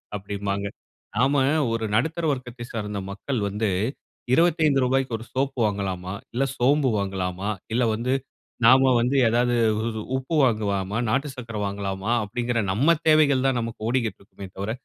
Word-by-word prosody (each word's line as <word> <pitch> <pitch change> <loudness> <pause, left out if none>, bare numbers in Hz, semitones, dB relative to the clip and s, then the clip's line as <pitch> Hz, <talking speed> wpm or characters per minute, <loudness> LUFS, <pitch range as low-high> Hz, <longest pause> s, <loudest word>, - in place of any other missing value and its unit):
அப்படின்பாங்க. 100 0 -3 0.5
நம்ப 135 +2 +3 0.3
ஒரு 115 -1 -1
நடுத்தர 160 +7 0
வர்க்கத்த 125 -2 -5
சார்ந்த 105 -3 -4
மக்கள் 115 +5 -3
வந்து 105 +1 -1 0.6
"ரூ.25 150 -6 +3
க்கு 120 -3 -4
ஒரு 115 - -10
சோப் 135 +1 -1
வாங்கலாமா 95 -2 -2 0.2
இல்ல, 130 +3 +1
சோம்பு 135 +2 +3
வாங்கலாமா 95 0 -2 0.2
இல்ல 125 +1 +2
வந்து 125 +4 -1 0.5
நம்ப 130 +1 +7
வந்து 125 +4 +1
ஏதாவது 120 +1 +2 0.6
உப்பு 135 +5 -3
வாங்கலாமா, 105 -3 0
நாட்டு 135 +5 0
சர்க்கரை 115 -4 -5
வாங்கலாமா" 100 +1 -3
அப்டீங்குற 120 +2 -2
நம்ப 145 - +3
தேவைகள் 140 -4 +4
தான் 125 -2 +1
நமக்கு 115 -1 -6
ஓடிக்கிட்டு 120 -5 -1
இருக்குமே 100 0 -11
தவிர, 100 +3 -3
120 Hz, 135 wpm, -24 LUFS, 100-130 Hz, 0.6 s, நம்ப